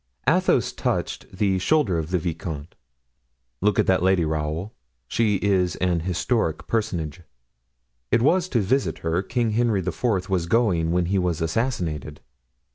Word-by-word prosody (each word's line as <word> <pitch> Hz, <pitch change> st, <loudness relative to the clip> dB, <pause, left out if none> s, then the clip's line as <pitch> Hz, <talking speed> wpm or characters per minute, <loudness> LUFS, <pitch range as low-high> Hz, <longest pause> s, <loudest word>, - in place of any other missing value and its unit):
Athos -, -, +3 dB
touched -, -, -3 dB
the 95 Hz, 0 st, +1 dB
shoulder 105 Hz, -, +2 dB
of 80 Hz, 0 st, -4 dB
the 90 Hz, -, +1 dB
vicomte. 80 Hz, -2 st, -5 dB, 0.9 s
"Look 105 Hz, 0 st, +2 dB
at -, -, +3 dB
this 95 Hz, -2 st, +3 dB
lady, 95 Hz, -2 st, +3 dB
Raoul, 80 Hz, +5 st, -3 dB, 0.3 s
she 110 Hz, -3 st, +1 dB
is 95 Hz, -4 st, +2 dB
an 90 Hz, -2 st, 0 dB
historic 90 Hz, 0 st, -1 dB
personage; 90 Hz, -9 st, -2 dB, 0.9 s
it 115 Hz, 0 st, +3 dB
was 180 Hz, +5 st, +3 dB
to 120 Hz, -, +1 dB
visit 130 Hz, +8 st, 0 dB
her 80 Hz, +2 st, +1 dB
King 115 Hz, +3 st, -1 dB
Henry 110 Hz, -3 st, +1 dB
IV. 95 Hz, +1 st, -1 dB
was 90 Hz, -3 st, 0 dB
going 90 Hz, -6 st, +2 dB
when 90 Hz, 0 st, +2 dB
he 95 Hz, +3 st, +1 dB
was 90 Hz, -3 st, 0 dB
assassinated." 80 Hz, -, -2 dB
95 Hz, 145 wpm, -24 LUFS, 85-110 Hz, 0.9 s, Athos